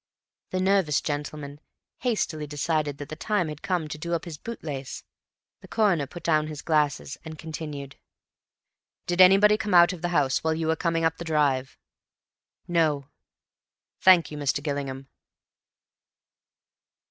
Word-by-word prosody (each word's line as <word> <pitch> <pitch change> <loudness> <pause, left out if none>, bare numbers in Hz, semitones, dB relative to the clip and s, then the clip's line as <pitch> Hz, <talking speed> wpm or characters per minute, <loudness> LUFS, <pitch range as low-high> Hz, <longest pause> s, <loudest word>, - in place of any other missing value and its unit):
The 185 - -2
nervous 190 -6 +2
gentleman 145 -1 -5 0.4
hastily 180 - -1
decided 150 -1 -1
that 145 0 -8
the 155 - -5
time 180 -1 -1
had 150 -1 -8
come 175 -4 -1
to 155 0 -7
do 170 +2 -2
up 170 - -4
his 160 -4 -8
bootlace. 145 - -6 0.6
The - - -14
Coroner 185 -10 +1
put 175 - -10
down 155 -2 +2
his 150 -2 -7
glasses 150 -3 0
and 160 0 -8
continued. 150 -4 -7 1.1
"Did 175 +1 +2
anybody 195 +3 +7
come 205 -3 -1
out 175 +2 +7
of 175 - -9
the 175 - -1
house 145 -6 +1
while 160 0 +1
you 160 0 -2
were 160 0 +2
coming 165 -1 0
up 165 0 +1
the - - -6
drive?" 145 -5 0 0.9
"No." 155 -5 +1 0.9
"Thank 180 -4 +6
you, 150 - -6
Mr. 145 0 0
Gillingham." 140 -2 -4
155 Hz, 145 wpm, -26 LUFS, 145-175 Hz, 1.1 s, anybody